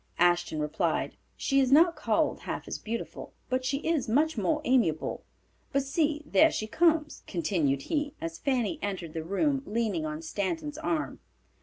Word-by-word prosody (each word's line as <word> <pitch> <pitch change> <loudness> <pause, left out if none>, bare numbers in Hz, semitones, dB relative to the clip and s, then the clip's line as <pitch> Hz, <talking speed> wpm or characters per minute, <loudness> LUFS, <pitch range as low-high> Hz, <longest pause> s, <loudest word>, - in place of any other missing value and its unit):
Ashton 175 -2 +2
replied, 150 0 -1 0.2
"She 275 - +2
is 265 -1 +2
not 335 +4 +6
called - - +1
half - - -5
as - - -4
beautiful, 230 +1 -5 0.2
but 255 0 0
she 260 +2 0
is 320 -8 +1
much 305 +7 +3
more 310 -2 +1
amiable; 225 - +1 0.5
but 275 - +1
see 300 +2 0
there 315 +2 +5
she 215 - -2
comes," 315 +4 +2
continued 160 -7 0
he, 290 -1 -2
as 165 0 -5
Fanny 270 +3 0
entered 185 -5 -4
the 160 - -3
room 270 - +1
leaning 210 -6 0
on 155 +1 -5
Stanton's 295 - -3
arm. 315 0 -2
255 Hz, 160 wpm, -29 LUFS, -, 0.5 s, not